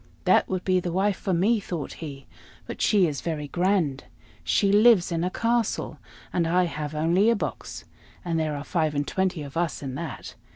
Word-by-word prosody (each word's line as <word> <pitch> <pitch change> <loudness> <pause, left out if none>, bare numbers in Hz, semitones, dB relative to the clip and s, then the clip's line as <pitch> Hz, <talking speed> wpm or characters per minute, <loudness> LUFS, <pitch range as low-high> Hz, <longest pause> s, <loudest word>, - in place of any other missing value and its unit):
"That - - +3
would 185 -1 -2
be 185 -1 +2
the 175 -1 -3
wife 195 +3 +1
for 190 - -3
me," 200 +6 +2
thought 170 -7 -5
he; 140 -4 -7 0.4
"but - - -7
she 205 -4 +4
is 150 -4 -3
very 155 -3 -3
grand. 175 -5 0 0.4
She 200 -1 +2
lives 210 -3 +5
in 165 0 -1
a 180 - 0
castle, 230 +2 -1 0.3
and 170 -2 +1
I 180 +2 +3
have 155 -3 -4
only 170 +8 +3
a 230 - +4
box, 205 - -5 0.4
and 165 -2 0
there 155 -2 -1
are 145 - -5
five 155 -3 -1
and 145 0 -1
twenty 190 -4 -1
of 140 +1 -10
us 170 -3 -1
in 135 -2 -4
that. 150 +1 -6
175 Hz, 200 wpm, -25 LUFS, 155-190 Hz, 0.4 s, lives